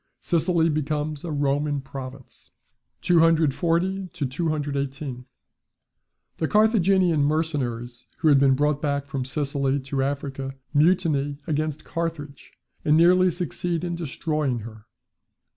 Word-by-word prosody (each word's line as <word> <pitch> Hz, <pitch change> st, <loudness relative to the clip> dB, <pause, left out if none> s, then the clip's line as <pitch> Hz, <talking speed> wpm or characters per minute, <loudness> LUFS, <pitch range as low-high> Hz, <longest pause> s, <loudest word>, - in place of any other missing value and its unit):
Sicily 170 Hz, -1 st, +1 dB
becomes 150 Hz, -1 st, -2 dB
a 170 Hz, -, -4 dB
Roman 145 Hz, 0 st, 0 dB
province. 135 Hz, -1 st, -10 dB, 0.5 s
240 170 Hz, +3 st, +2 dB
to 170 Hz, -4 st, -4 dB
218. 140 Hz, -3 st, -3 dB, 1.1 s
The 160 Hz, -, 0 dB
Carthaginian 190 Hz, -6 st, +3 dB
mercenaries 135 Hz, -6 st, -2 dB
who 160 Hz, -, +2 dB
had 140 Hz, -2 st, +6 dB
been 135 Hz, -1 st, +4 dB
brought 150 Hz, +1 st, +1 dB
back 140 Hz, -2 st, -1 dB
from 140 Hz, -2 st, -4 dB
Sicily 140 Hz, 0 st, -1 dB
to 135 Hz, 0 st, -2 dB
Africa, 135 Hz, -1 st, -3 dB, 0.2 s
mutiny 150 Hz, -3 st, +2 dB
against 155 Hz, -1 st, -2 dB
Carthage, 165 Hz, -4 st, -5 dB, 0.3 s
and 155 Hz, -1 st, +4 dB
nearly 180 Hz, +2 st, +5 dB
succeed 175 Hz, -1 st, -3 dB
in 175 Hz, -1 st, -2 dB
destroying 155 Hz, -5 st, -2 dB
her. 110 Hz, 0 st, -11 dB
150 Hz, 110 wpm, -24 LUFS, 140-165 Hz, 1.1 s, had